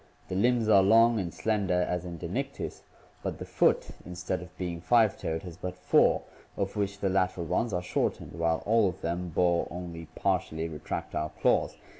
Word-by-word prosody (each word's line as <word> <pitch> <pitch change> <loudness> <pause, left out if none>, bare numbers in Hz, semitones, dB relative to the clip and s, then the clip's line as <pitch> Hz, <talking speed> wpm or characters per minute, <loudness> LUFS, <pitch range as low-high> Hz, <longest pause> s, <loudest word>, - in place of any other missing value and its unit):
The 95 - -3
limbs 120 +3 +2
are 100 -3 +7
long 115 +3 +5
and 90 -3 -3
slender 100 -4 +1
as 90 0 -2
in 85 -1 -6
Dinictis, - - -4 0.4
but - - -3
the - - -7
foot, - - +2
instead 90 +1 -4
of 90 0 -12
being 85 -2 -4
five 110 +1 +4
toed, 80 0 -3
has 85 -3 -9
but 90 0 -5
four, 90 0 +3 0.3
of 100 +1 -2
which 100 -1 -1
the 95 - +1
lateral 95 -2 0
ones 100 +7 0
are 90 -2 -1
shortened; 90 - -1
while 85 -1 0
all 110 -2 +4
of 90 - -9
them 85 +2 -2
bore 85 +1 +2
only 85 -2 -7
partially 85 -4 0
retractile 75 0 -4
claws. - - +2
90 Hz, 180 wpm, -29 LUFS, 85-100 Hz, 0.4 s, are